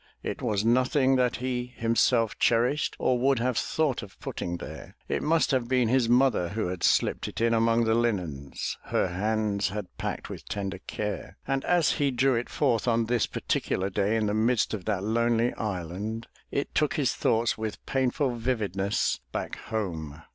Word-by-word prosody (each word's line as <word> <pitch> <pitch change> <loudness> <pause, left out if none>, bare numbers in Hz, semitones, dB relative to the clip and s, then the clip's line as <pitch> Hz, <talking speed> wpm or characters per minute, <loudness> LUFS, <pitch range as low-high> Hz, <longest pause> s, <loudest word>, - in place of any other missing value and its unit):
It - - -4
was 105 -4 0
nothing 130 +3 +3
that 125 -1 +2
he 125 0 -2
himself 115 0 +2
cherished 120 +5 +2
or 125 -1 +1
would 135 +1 +3
have 125 +1 0
thought 150 +1 0
of 105 -3 -12
putting 85 0 -4
there. - - -9
It - - -1
must 160 +1 +2
have 130 -3 +1
been 125 -2 +2
his 125 -2 +3
mother 125 -8 +3
who 105 -3 -2
had 90 -2 -5
slipped - - +2
it - - -6
in 115 0 +3
among 115 +1 +3
the 110 0 +2
linens 90 - -2
her - - +1
hands 100 +1 0
had 95 -3 -6
packed - - -3
with - - -9
tender 100 -2 -3
care, 105 -2 -4
and 135 0 0
as 175 -6 +3
he 145 -1 +1
drew 130 +1 +2
it 120 0 -1
forth 125 -5 +1
on 115 -1 +2
this 120 0 +1
particular 95 +1 -1
day 100 +3 +1
in 110 -1 +1
the 105 - 0
midst 115 +2 +2
of 100 -4 -4
that 100 -3 -1
lonely 115 +2 +2
island, 105 +3 -4 0.2
it 140 - -2
took 150 -1 +1
his 140 -5 +1
thoughts 115 0 +1
with 110 -1 -5
painful 130 0 0
vividness 105 -5 0
back - - -3
home. 80 -9 -4
115 Hz, 180 wpm, -27 LUFS, 105-125 Hz, 0.2 s, nothing